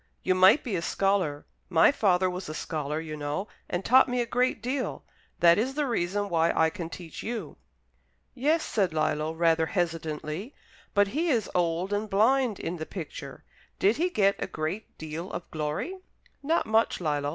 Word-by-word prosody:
You 185 - +3
might 185 +8 +6
be 230 -7 -2
a 170 - -1
scholar. 185 -6 0 0.2
My 165 +4 +6
father 190 -8 +2
was 180 -2 -4
a 155 - -5
scholar, 150 -1 -3
you 160 -1 -6
know, 150 +7 -3 0.2
and 175 +2 -2
taught 260 +1 +6
me 250 0 0
a 240 - +1
great 250 +2 +1
deal. 255 +4 -3 0.4
That 170 +2 +6
is 260 +4 -1
the 295 -1 +1
reason 205 -4 -1
why 165 -2 +2
I 160 0 +3
can 165 0 -6
teach 170 -2 -8
you." 235 0 -5 0.8
"Yes," 300 +6 +1
said 190 -6 0
Lillo, 155 0 0
rather 165 0 +2
hesitatingly. 165 - -3 0.4
"But 205 0 +4
he 320 +9 0
is 230 -8 +1
old 175 +2 0
and 210 +1 -1
blind 230 +2 +3
in 175 +2 -4
the 160 - -5
picture. 170 -6 -8 0.3
Did 205 +4 +3
he 350 +4 +1
get 200 - +2
a - - -2
great 160 +7 -5
deal 160 +4 -6
of 175 - -7
glory?" 155 - -3 0.4
"Not 320 +4 +1
much, 220 +1 +2
Lillo. 145 -4 -1
185 Hz, 180 wpm, -27 LUFS, 160-230 Hz, 0.8 s, might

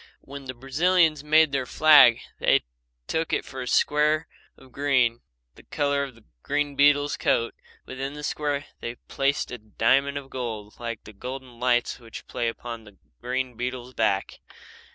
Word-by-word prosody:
When 140 0 -10
the 130 0 -6
Brazilians 155 +4 +2
made 155 0 +5
their 135 -2 -1
flag 150 -7 +7 0.2
they - - +3 0.4
took 160 0 -1
for 130 -1 -8
it - - -3
a - - -9
square 150 +4 +2 0.3
of 130 - -18
green 130 -4 +1 0.3
the - - -16
colour 140 -1 0
of 135 -4 -7
the 115 - -20 0.2
green 145 - -1
beetle's 145 +1 +4
coat. 115 0 +1 0.3
Within 135 +2 -5
this 150 0 -6
square 145 -1 -2
they 120 0 -5
placed 140 +3 -1
a 125 - -6
diamond 130 +6 +1
of 135 -1 -8
gold 110 -5 -6
like 115 -2 -5
the 110 - -12
golden 125 +2 -8
lights 125 -1 +1
which 115 -2 -10
play 120 - -2
upon 115 0 -6
the 105 -2 -17 0.2
green 125 0 -2
beetle's 125 +1 -5
back. 100 -5 0
130 Hz, 165 wpm, -25 LUFS, 120-145 Hz, 0.4 s, flag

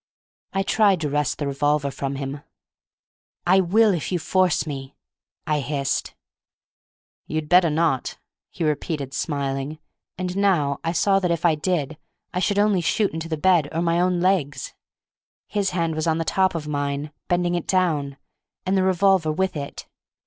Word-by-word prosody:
I 195 - 0
tried 200 -2 +3
to 150 - -1
wrest 145 -1 0
the 145 - -3
revolver 140 +1 0
from 135 0 -4
him. 140 +1 -5 1.0
"I 185 +2 +5
will 205 +4 +4
if 170 -1 -3
you 180 - +1
force 185 +1 +1
me," 135 -2 -6 0.5
I 150 -1 +1
hissed. 140 -1 -2 1.1
"You'd 155 -1 -3
better 175 0 +5
not," 155 -4 0 0.3
he 175 - -5
repeated, 150 -2 -2
smiling; 140 0 -2 0.4
and 180 -1 -3
now 175 -9 +2
I 165 - 0
saw 195 +3 +3
that 180 -2 -1
if 170 0 0
I 170 - +5
did 155 -2 -2 0.3
I 180 - 0
should 200 +2 +1
only 205 -3 +3
shoot 200 +3 +1
into 160 +1 -5
the 160 - -1
bed 170 -3 +3
or 165 +1 -1
my 170 0 +2
own 180 0 +2
legs. 175 -6 0 0.7
His 200 -2 0
hand 170 -2 -1
was 155 +1 -2
on 160 0 +2
the 165 - -2
top 190 0 +2
of 155 -2 -4
mine, 145 0 -2 0.2
bending 175 0 +1
it 175 -2 -2
down, 155 -7 +1 0.5
and 190 +1 +1
the 190 - +3
revolver 185 -3 +3
with 185 +3 -1
it. 140 -1 -6
165 Hz, 170 wpm, -23 LUFS, 145-185 Hz, 1.1 s, I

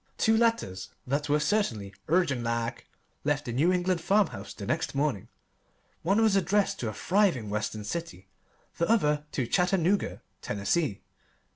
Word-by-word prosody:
Two 220 -1 +3
letters 220 - 0 0.2
that 145 +3 -1
were 150 +1 +3
certainly 150 - 0
"urgent 160 -6 +2
like" 115 0 -2 0.4
left 145 0 0
the 120 - -3
New 155 +9 +3
England 180 -1 +1
farmhouse 185 - +1
the 100 - -7
next 155 +4 -1
morning. 140 -9 0 0.7
One 200 +7 +2
was 215 -3 +4
addressed 195 +1 +1
to 115 - -2
a - - -6
thriving 175 - +1
Western 105 0 -2
city, 165 - -5 0.5
the 170 - +1
other 150 -10 +2
to 130 - 0
Chattanooga, 180 - +1 0.2
Tennessee. 105 +4 -1
150 Hz, 145 wpm, -28 LUFS, 115-190 Hz, 0.7 s, was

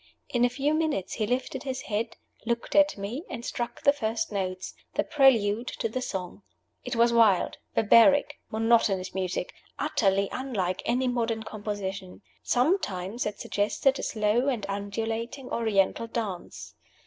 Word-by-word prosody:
In 245 -4 +1
a 245 - +5
few 275 +4 0
minutes 310 - 0
he 215 - -1
lifted 255 +2 -2
his 260 -1 -4
head, 220 +1 -3 0.3
looked 235 0 -2
at 295 -3 +5
me, 215 +10 -4
and 240 -2 -6
struck 240 +3 -4
the 280 -1 +6
first 220 -5 -2
notes 185 -2 -3 0.2
the - - +2
prelude 235 -5 +3
to - - 0
the 255 +3 -3
song. 190 -4 -5 0.4
It 250 - -4
was 235 0 +4
wild, 220 -5 +4 0.2
barbaric, 230 +7 +5
monotonous 220 -4 +2
music, 185 -1 -2 0.2
utterly 200 -9 +1
unlike 195 -9 -2
any 250 +2 +1
modern 230 -2 -1
composition. 200 -3 -5 0.2
Sometimes 240 - 0
it 210 - -5
suggested 260 +6 +1
a - - -2
slow 220 +4 +1
and 240 -7 0
undulating 225 +6 -4
Oriental 220 0 +1
dance. 215 -6 -5
225 Hz, 145 wpm, -27 LUFS, 200-250 Hz, 0.4 s, the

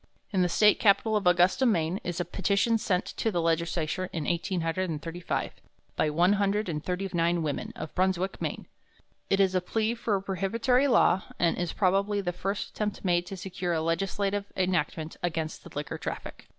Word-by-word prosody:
In 190 - +3
the 180 - +2
State 210 +4 +4
Capitol 215 +1 +4
at 205 -3 +1
Augusta, 180 +7 +4
Maine, 180 -6 +2
is 175 0 -3
a 175 - 0
petition 200 +5 +1
sent 185 -3 0
to 225 - +1
the 180 -5 -1
legislature 170 +2 0
in 160 - -3
1835 170 0 -2 0.4
by 155 - +1
one 175 +6 +3
hundred 205 +1 +1
and 155 -3 -3
thirty 185 +2 -2
nine 170 0 +1
women 145 -3 -3
of 155 - -7
Brunswick, 190 0 0
Maine. - - -3 0.6
It 195 - +2
is 190 -1 +4
a 185 - +2
plea 220 +5 0
for 230 -3 -1
a 195 - -1
prohibitory 230 +8 +1
law, 190 -7 +4 0.2
and 170 -1 +2
is, 175 -1 -2
probably, 200 +1 +1
the 180 -3 -2
first 195 +3 -3
attempt 210 -2 -3
made 175 -1 +2
to 195 - -6
secure 180 -1 -3
a 160 - 0
legislative 195 +4 -1
enactment 170 -3 -1
against 160 -2 -3
the - - -11
liquor 145 0 -4
traffic. - - -6
185 Hz, 180 wpm, -28 LUFS, 170-200 Hz, 0.6 s, State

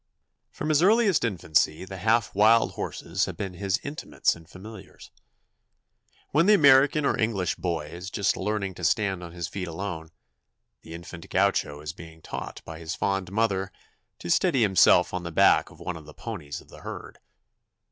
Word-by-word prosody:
From - - -5
his 155 0 +3
earliest 205 -1 +4
infancy 85 -5 0
the 95 0 -8
half 110 +3 +1
wild 110 +3 +4
horses - - -3
have - - -7
been 95 -2 -4
his 100 +2 -1
intimates 145 +2 -1
and 85 -1 -16
familiars. 110 +4 -12 1.2
When 160 +6 +3
the 210 - +7
American 145 -1 +5
or - - +1
English 100 -6 0
boy 85 -4 -2
is 85 +4 -8
just 100 -1 0
learning 100 -1 -2
to 85 - -11
stand 95 0 +1
on 85 -1 -8
his 85 -1 -5
feet 95 -2 -5
alone, 85 -1 -5 0.7
the 80 - -10
infant 85 0 -10
Gaucho 75 0 +1
is 75 +2 -6
being 80 -2 -12
taught - - -7
by 80 0 -8
his 85 +1 -5
fond 95 0 -2
mother 100 -3 0 0.5
to 85 - -5
steady 140 - +3
himself 95 -4 +5
on 90 - -2
the 85 -1 -6
back - - +4
of - - -17
one 90 - -5
of 80 - -12
the 75 - -13
ponies 85 -11 -7
of - - -21
the - - -13
herd. - - -9
95 Hz, 175 wpm, -26 LUFS, 85-115 Hz, 1.2 s, the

